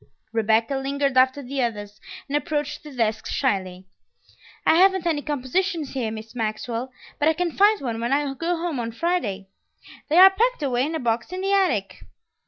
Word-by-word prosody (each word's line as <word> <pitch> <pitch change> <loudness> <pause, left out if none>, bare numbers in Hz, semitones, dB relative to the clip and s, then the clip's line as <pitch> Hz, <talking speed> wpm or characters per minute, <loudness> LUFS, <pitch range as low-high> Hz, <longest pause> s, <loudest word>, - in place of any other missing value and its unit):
Rebecca 225 +4 +2
lingered 275 0 -1
after 260 +2 +3
the 270 +1 -3
others, 210 -3 -4 0.3
and 285 - -3
approached 295 -1 -2
the 300 - -11
desk 225 -4 -1
shyly. 185 -7 -2 0.8
"I - - +5
haven't 380 0 +4
any 315 -4 0
compositions 300 +3 -2
here, 250 -5 -2
Miss 220 +1 -8
Maxwell, 230 +2 -3 0.3
but 295 - +2
I 320 - +4
can 350 +1 -1
find 410 +5 +4
one 235 -4 -3
when 235 +2 -1
I 280 0 +1
go 335 +5 -2
home 330 -5 -3
on 230 -1 -4
Friday. 225 - -2 0.6
They 315 - +2
are 380 +1 +10
packed 465 -1 0
away 255 -1 +1
in 320 - -4
a - - -2
box 235 +2 -1
in 370 0 -4
the 390 +1 0
attic." 320 - +1
275 Hz, 185 wpm, -23 LUFS, 230-335 Hz, 0.8 s, are